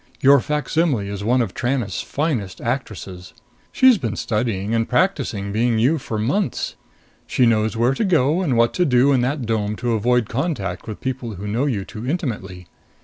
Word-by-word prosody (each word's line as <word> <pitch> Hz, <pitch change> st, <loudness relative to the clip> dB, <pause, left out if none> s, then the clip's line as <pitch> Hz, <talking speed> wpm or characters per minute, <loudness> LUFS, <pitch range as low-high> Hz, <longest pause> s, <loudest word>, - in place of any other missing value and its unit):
Your 140 Hz, +1 st, +6 dB
facsimile 150 Hz, -5 st, 0 dB
is 100 Hz, 0 st, -5 dB
one 125 Hz, +3 st, +2 dB
of 100 Hz, -, -5 dB
Tranest's 120 Hz, -4 st, -1 dB
finest 130 Hz, -, -2 dB
actresses. 105 Hz, -7 st, -5 dB, 0.4 s
She's 260 Hz, -5 st, +5 dB
been 115 Hz, -4 st, -3 dB
studying 105 Hz, -2 st, -1 dB
and 115 Hz, 0 st, 0 dB
practicing 125 Hz, -, 0 dB
being 115 Hz, +2 st, +1 dB
you 135 Hz, +8 st, +2 dB
for 115 Hz, -4 st, -4 dB
months. 135 Hz, -, -1 dB, 0.5 s
She 125 Hz, -, +2 dB
knows 110 Hz, -1 st, +2 dB
where 120 Hz, +3 st, +3 dB
to 180 Hz, -, -1 dB
go 165 Hz, -3 st, +2 dB
and 140 Hz, -10 st, 0 dB
what 115 Hz, 0 st, +3 dB
to 180 Hz, -, +2 dB
do 130 Hz, -1 st, +4 dB
in 130 Hz, -3 st, +3 dB
that 130 Hz, +1 st, -1 dB
dome 105 Hz, -2 st, -1 dB
to 120 Hz, +1 st, -1 dB
avoid 120 Hz, +1 st, +2 dB
contact 115 Hz, -, -3 dB
with 110 Hz, -, -7 dB
people 125 Hz, -4 st, -4 dB
who 95 Hz, +3 st, -7 dB
know 115 Hz, +7 st, 0 dB
you 105 Hz, -8 st, -2 dB
too 115 Hz, +4 st, -6 dB
intimately. 105 Hz, -, -4 dB
120 Hz, 180 wpm, -21 LUFS, 105-140 Hz, 0.5 s, Your